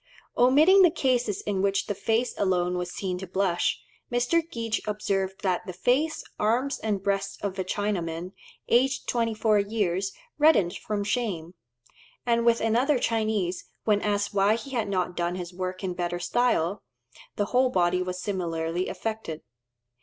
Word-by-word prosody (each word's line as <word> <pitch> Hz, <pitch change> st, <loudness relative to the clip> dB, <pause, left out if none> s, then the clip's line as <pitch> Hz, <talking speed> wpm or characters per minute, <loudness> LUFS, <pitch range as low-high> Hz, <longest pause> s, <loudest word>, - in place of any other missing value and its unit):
Omitting 300 Hz, +11 st, +6 dB
the 360 Hz, -, +7 dB
cases 245 Hz, -9 st, 0 dB
in 200 Hz, -2 st, -1 dB
which 195 Hz, 0 st, +1 dB
the 205 Hz, -, -2 dB
face 225 Hz, +5 st, 0 dB
alone 180 Hz, -2 st, +1 dB
was 180 Hz, 0 st, -3 dB
seen 185 Hz, -2 st, -3 dB
to 190 Hz, -, -6 dB
blush, 185 Hz, -1 st, 0 dB, 0.3 s
Mr. 245 Hz, +8 st, +2 dB
Geach 230 Hz, -4 st, -2 dB
observed 195 Hz, -2 st, -2 dB
that 185 Hz, +1 st, 0 dB
the 185 Hz, -, -5 dB
face, 260 Hz, -, +1 dB, 0.2 s
arms, 245 Hz, +6 st, +1 dB
and 205 Hz, -3 st, -2 dB
breast 195 Hz, 0 st, -1 dB
of 195 Hz, -1 st, -3 dB
a -, -, +1 dB
Chinaman, 180 Hz, -3 st, -2 dB, 0.4 s
aged 265 Hz, +3 st, +2 dB
24 225 Hz, -2 st, +2 dB
years, 200 Hz, -2 st, 0 dB, 0.3 s
reddened 290 Hz, -, +4 dB
from 210 Hz, -1 st, -3 dB
shame; 200 Hz, -7 st, -2 dB, 0.7 s
and 235 Hz, -1 st, +2 dB
with 235 Hz, 0 st, +4 dB
another 245 Hz, +6 st, +2 dB
Chinese, 215 Hz, -6 st, -1 dB, 0.2 s
when 210 Hz, -2 st, +2 dB
asked 205 Hz, -1 st, 0 dB
why 200 Hz, +2 st, +4 dB
he 230 Hz, +4 st, -7 dB
had 230 Hz, -5 st, -1 dB
not 180 Hz, -2 st, -1 dB
done 175 Hz, 0 st, -1 dB
his 180 Hz, -1 st, -6 dB
work 185 Hz, +1 st, -4 dB
in 185 Hz, -1 st, -1 dB
better 175 Hz, 0 st, -2 dB
style, 200 Hz, -3 st, +1 dB, 0.5 s
the 205 Hz, -, 0 dB
whole 255 Hz, +1 st, +4 dB
body 180 Hz, -4 st, +2 dB
was 180 Hz, 0 st, -3 dB
similarly 175 Hz, -2 st, -2 dB
affected. 215 Hz, -8 st, -4 dB
205 Hz, 155 wpm, -27 LUFS, 185-230 Hz, 0.7 s, the